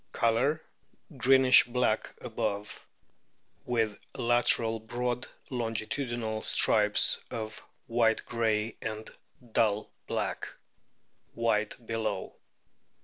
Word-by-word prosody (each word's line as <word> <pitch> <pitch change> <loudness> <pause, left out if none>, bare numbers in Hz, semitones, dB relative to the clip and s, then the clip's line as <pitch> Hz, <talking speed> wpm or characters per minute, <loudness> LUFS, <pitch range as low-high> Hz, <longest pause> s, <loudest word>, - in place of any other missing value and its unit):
Colour, 120 +7 +2 0.6
greenish 130 0 +6
black 125 -3 -1
above, 110 -4 -4 0.8
with 115 -4 0 0.2
lateral 115 -1 +2
broad 120 +3 -3 0.2
longitudinal 115 -1 -2
stripes - - +4
of 110 -1 -6 0.3
white 115 -1 +1
grey 110 -2 -1
and 110 0 -5 0.4
dull 105 -1 +1 0.2
black; - - -3 0.9
white 115 0 -1
below. 110 -4 -3
115 Hz, 80 wpm, -29 LUFS, 110-120 Hz, 0.9 s, greenish